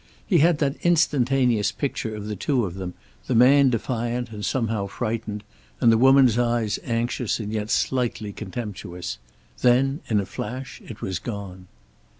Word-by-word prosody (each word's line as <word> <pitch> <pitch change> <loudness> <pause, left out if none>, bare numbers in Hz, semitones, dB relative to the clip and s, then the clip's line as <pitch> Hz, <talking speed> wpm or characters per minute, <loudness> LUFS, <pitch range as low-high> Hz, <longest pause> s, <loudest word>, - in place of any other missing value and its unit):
He 180 -6 +3
had 165 +1 +4
that 140 -2 0
instantaneous 135 -9 +2
picture 120 -6 -3
of 105 -1 -6
the 105 0 -4
two 125 +3 0
of 90 - -5
them, 95 -1 -6 0.3
the - - 0
man 135 +3 +6
defiant 120 0 -2
and 105 -1 -7
somehow 110 -5 -1
frightened, 110 -1 -4 0.4
and 115 - +5
the 115 - +4
woman's 130 -2 +6
eyes 120 -3 0
anxious 120 -1 -1
and 105 -1 -4
yet 105 -1 -2
slightly 115 -6 0
contemptuous. 95 -5 -6 0.4
Then, 135 +4 +3
in 110 -2 +3
a 100 - -2
flash, 125 +7 -6
it 110 - -10
was 95 -3 -2
gone. 95 -4 -7
115 Hz, 155 wpm, -24 LUFS, 105-130 Hz, 0.4 s, man